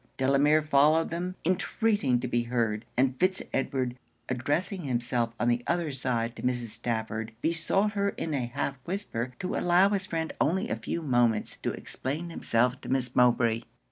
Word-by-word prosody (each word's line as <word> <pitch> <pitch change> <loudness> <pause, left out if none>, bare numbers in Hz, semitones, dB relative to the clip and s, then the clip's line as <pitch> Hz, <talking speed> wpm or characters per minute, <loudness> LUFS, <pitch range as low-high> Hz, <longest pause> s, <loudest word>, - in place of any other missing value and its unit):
Delamere 140 +3 +4
followed 155 +2 +4
them, 180 +2 -3
intreating 185 - +1
to 125 - -2
be 120 -1 0
heard; 115 -2 -1
and 130 0 +3
Fitz 185 +1 +2
Edward, 130 -2 -1 0.3
addressing 170 - -1
himself 120 -2 -1
on 120 - +1
the 120 0 +2
other 170 -3 0
side 120 -3 -1
to - - -8
Mrs. 120 -2 -1
Stafford, 110 0 -3
besought 170 +5 +1
her 200 -1 +1
in 165 -5 -4
a 130 -4 -1
half 135 +2 -3
whisper 130 - -3
to 185 - -3
allow 180 +3 +4
his 195 -2 -1
friend 165 -2 -2
only 190 +9 +1
a - - 0
few 170 - -4
moments 120 -6 +2
to - - -2
explain 155 +6 -5
himself 125 -3 +1
to - - -8
Miss 130 -2 0
Mowbray. 120 -2 +4
135 Hz, 170 wpm, -28 LUFS, 120-170 Hz, 0.3 s, Delamere